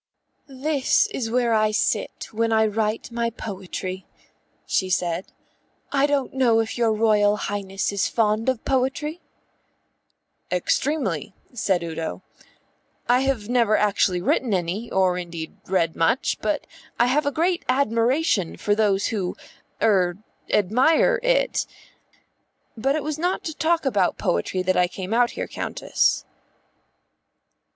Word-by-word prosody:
"This 275 +1 +1
is 230 -4 -3
where 240 0 +1
I 215 -1 +3
sit 215 0 -1
when 225 +1 0
I 220 0 +4
write 215 +2 -1
my 235 0 -1
poetry," 190 -3 -6 0.6
she 185 - 0
said. 180 0 -1 0.6
"I 280 0 +3
don't 285 -2 -1
know 245 -4 +3
if 225 -1 -2
your 235 -2 +2
Royal 210 -1 +3
Highness 195 -2 -2
is 200 -1 0
fond 220 +1 +1
of 260 -3 -2
poetry?" 275 +5 -1 1.3
"Extremely," 190 - -1 0.2
said 190 -7 0
Udo. 160 - -5 0.8
"I 245 +1 +4
have 265 -6 -1
never 235 -3 +3
actually 195 -3 +1
written 225 +1 +1
any 185 +6 -3
or 185 -1 +2
indeed 170 -2 -7
read 170 -4 +1
much, 200 +10 +1
but - - -1 0.3
I - - +5
have 285 +4 +1
a - - +2
great 340 +5 0
admiration 245 - +1
for 205 - +1
those 205 -2 +2
who 190 -4 -2 0.5
er 185 -5 +3 0.3
admire 260 - +3
it. - - +1 1.1
But 270 +5 0
it 310 - -2
was 310 0 -3
not 360 +3 -1
to 315 - -4
talk 325 0 +1
about 200 -9 +1
poetry 85 - -1
that 185 +1 +1
I 180 - +3
came 190 +3 -5
out 240 +1 +4
here, - - -3
Countess." - - 0
220 Hz, 135 wpm, -23 LUFS, 190-265 Hz, 1.3 s, I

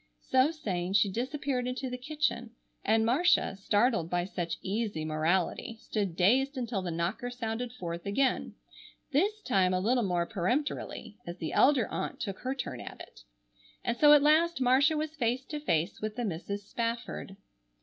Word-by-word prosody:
So 260 +2 +3
saying, 190 - -3
she 200 0 +4
disappeared 255 +2 -2
into 255 +1 -3
the 250 - -4
kitchen; 255 -4 -2 0.3
and 220 +1 +3
Marcia, 305 - +3
startled 205 -2 +1
by 175 0 0
such 175 -3 -3
easy 200 -5 -2
morality, 170 +8 0
stood 200 -7 -2
dazed 260 - +3
until 235 -5 -2
the 180 - -4
knocker 170 +9 -2
sounded 240 0 -4
forth 170 -6 -6
again, 260 +7 0 0.6
this 410 +9 +1
time 185 -6 +2
a - - +1
little 240 +6 +2
more 175 -5 0
peremptorily, 225 - -2
as 175 +1 -6
the 160 -3 -4
elder 265 -4 +4
aunt - - -4
took 195 -2 -4
her 260 +1 -2
turn 265 - -5
at - - -9
it. - - -12 0.6
And - - 0
so 295 +4 +6
at 290 -1 +6
last 320 +2 +4
Marcia 270 +5 +4
was 310 +1 -3
face 250 -1 0
to 300 +1 -5
face 170 - 0
with 215 0 -3
the 245 -1 -2
Misses 200 +2 -4
Spafford. 230 -4 -4
230 Hz, 170 wpm, -30 LUFS, 190-265 Hz, 0.6 s, so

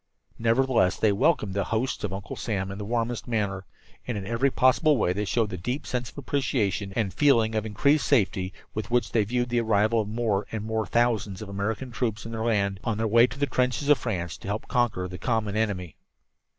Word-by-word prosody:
Nevertheless 115 -3 +2
they 110 - +3
welcomed 105 - +2
the 100 -1 0
hosts 115 +4 -2
of 105 - -2
Uncle 95 +1 -6
Sam 95 -3 -3
in 100 - -7
the 105 - -4
warmest 120 +2 -2
manner, 100 -5 -1 0.4
and 120 -3 -2
in 95 - -5
every 115 +6 +1
possible 135 +4 +3
way 90 -5 +1
showed 110 +1 0
the 90 - -4
deep 125 - -3
sense 125 -1 -3
of - - -19
appreciation 115 -8 -1
and 105 -5 0
feeling 115 -7 +3
of 110 0 -1
increased 140 +6 +2
safety 95 -7 +2 0.2
with 110 +1 -4
which 120 0 +1
they 110 - +3
viewed 120 +3 -1
the 120 0 +1
arrival 110 +1 +2
of 105 - -5
more 110 -3 -1
and 110 -2 -3
more 110 -2 -1
thousands 115 -5 +1
of 105 - -9
American 100 +5 -3
troops 115 -2 -2
in 115 - -6
their 110 -1 -3
land, 100 -4 +1
on 115 -3 -1
their 110 - 0
way 115 +3 +6
to 130 - -9
the 145 - +1
trenches 130 +1 0
of 145 - +6
France 85 -8 -3
to - - -11
help 105 +3 -3
conquer 120 -7 0
the 90 0 -8
common 110 -4 -1
enemy. 100 -7 -2
110 Hz, 215 wpm, -26 LUFS, 100-120 Hz, 0.4 s, way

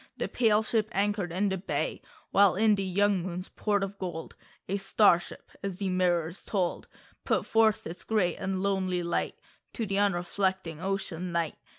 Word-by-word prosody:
The - - -1
pale 220 -3 +3
ship 220 -1 0
anchored 200 -2 0
in 195 +4 +1
the 190 -1 -2
bay, 185 - -2 0.3
While 200 -1 +5
in 215 +2 +4
the 200 - 0
young 195 0 +2
moon's 180 +1 -5
port 205 -2 0
of 195 0 -5
gold 170 -3 -5 0.3
A 195 - 0
star 195 -2 +4
ship - - -12
— - - -23
as 195 -2 -3
the 195 -1 -2
mirrors 175 -2 +1
told 185 -4 -2 0.2
— - - -31
Put - - +1
forth 220 -1 +3
its 170 +2 -7
great 195 -6 +1
and 190 0 -2
lonely 185 -3 0
light 170 0 -1 0.4
To 230 - -2
the 200 -1 0
unreflecting 185 -3 0
Ocean, 190 -2 -3
Night. 170 -2 0
190 Hz, 185 wpm, -29 LUFS, 175-205 Hz, 0.4 s, While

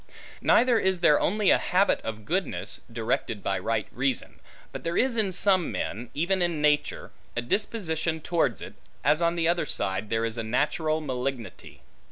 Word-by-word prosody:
Neither 240 -2 +4
is 190 -2 0
there 150 - +5
only 210 +1 +2
a - - +5
habit 190 +3 +2
of 110 -1 -6
goodness, 150 - -2
directed 115 -2 -2
by 100 - 0
right 115 -1 -1
reason; 130 0 -2 0.3
but - - -7
there 170 +1 -2
is 255 -1 +2
in 215 -4 +1
some 185 -1 +3
men, 115 +3 -4
even 180 +5 +1
in 170 -3 0
nature, 150 0 0 0.3
a - - +1
disposition 165 - -1
towards 170 +1 0
it; - - -9 0.3
as 150 +4 +3
on 170 0 +2
the 165 -1 +1
other 170 0 +1
side, 95 +2 -2
there 115 0 0
is 115 0 -3
a - - -2
natural 150 +7 0
malignity. 125 - -5
155 Hz, 175 wpm, -26 LUFS, 115-180 Hz, 0.3 s, there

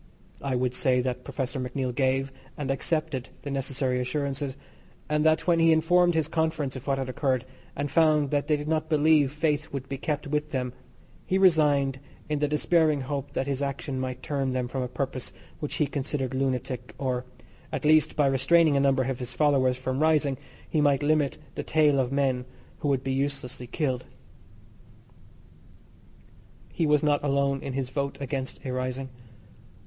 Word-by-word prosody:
I 135 -2 -1
would 125 0 0
say 130 0 +2
that 125 0 -3
Professor 135 0 -3
MacNeill 125 0 -2
gave 135 +1 0 0.2
and 140 -2 -2
accepted 135 -2 -2
the 140 - -4
necessary 135 -1 -1
assurances, 135 +1 -2 0.5
and 150 0 +1
that 155 0 +3
when 170 -2 +3
he 165 0 +5
informed 175 +2 +4
his 160 -2 +2
conference 160 -4 -1
of 130 +2 -8
what 135 -1 +1
had 135 -1 -2
occurred, 130 -1 0 0.3
and 145 0 -3
found 155 -3 +3
that 145 -1 0
they 150 -1 +3
did 145 +1 -6
not 155 0 0
believe 155 -2 +4
faith 150 0 -1
would 135 -1 -5
be 135 -1 -5
kept 150 0 -2
with 150 +1 -1
them, 125 -4 -2 0.5
he 190 - +2
resigned 145 -7 +4 0.3
in 150 -1 0
the 150 - +2
dispairing 150 0 +2
hope 140 +1 -4
that 130 - -1
his 140 0 -2
action 140 -1 -3
might 130 -1 -4
turn 135 -3 -1
them 125 -1 -1
from 130 +1 -3
a 125 - -1
purpose 130 0 -4 0.3
which 150 - -4
he 150 - +2
considered 140 -2 -3
lunatic, 130 -1 -2
or, 125 -2 -1 0.5
at - - -3
least, 155 0 +4
by 145 - +3
restraining 140 +4 +4
a - - +4
number 135 -1 +3
of 130 -1 -3
his 125 0 -5
followers 135 -4 +3
from 130 +1 -2
rising, 155 -3 +3 0.3
he 155 - +1
might 145 -1 +3
limit 150 -2 +2 0.2
the - - -3
tale 150 -3 +3
of 130 -1 0
men 135 -3 +1 0.3
who - - -2
would 135 -2 +1
be 135 - -1
uselessly 135 -3 -3
killed. 130 -2 -2 2.7
He 165 - +1
was 150 0 +3
not 145 -1 +2
alone 140 -1 +1
in 135 - -5
his 130 -1 -3
vote 140 0 -2
against 135 -1 -4
a 130 - -2
rising. 130 +1 -3
140 Hz, 180 wpm, -27 LUFS, 130-150 Hz, 2.7 s, he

